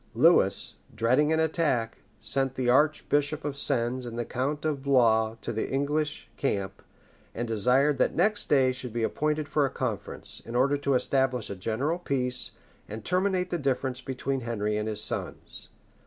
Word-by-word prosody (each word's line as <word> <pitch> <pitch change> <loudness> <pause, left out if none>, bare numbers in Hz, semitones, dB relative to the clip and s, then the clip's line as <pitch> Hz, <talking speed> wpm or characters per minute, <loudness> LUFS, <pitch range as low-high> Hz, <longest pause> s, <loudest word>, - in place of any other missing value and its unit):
Lewis, - - +3 0.2
dreading 130 +7 +3
an 160 - +2
attack, 155 -8 0 0.2
sent 135 -1 -1
the 130 -1 -1
archbishop 145 +1 +2
of 145 -2 -2
Sens 130 -3 0
and 120 -1 -6
the 120 - -2
count 140 +6 -2
of 150 -3 -1
Blois 115 -5 +3
to 115 - -4
the 110 - -2
English 150 +2 -1
camp, 100 -8 -2 0.5
and 120 +1 -2
desired 125 +6 +2
that - - +2
next 210 0 +1
day 135 -3 +4
should 125 -2 -6
be 115 -1 -1
appointed 150 +5 0
for 150 0 +1
a 135 - +1
conference, 120 -7 -3
in 115 - -7
order 135 +3 +3
to 140 -1 0
establish 130 -3 +1
a - - -4
general 125 - -1
peace, 125 -6 -1 0.4
and 110 +1 -7
terminate 185 0 +1
the 175 - -1
difference 130 -2 -1
between 135 +1 -3
Henry 105 -3 -2
and 105 +1 -1
his 105 0 -1
sons. - - -4
130 Hz, 170 wpm, -28 LUFS, 115-145 Hz, 0.5 s, day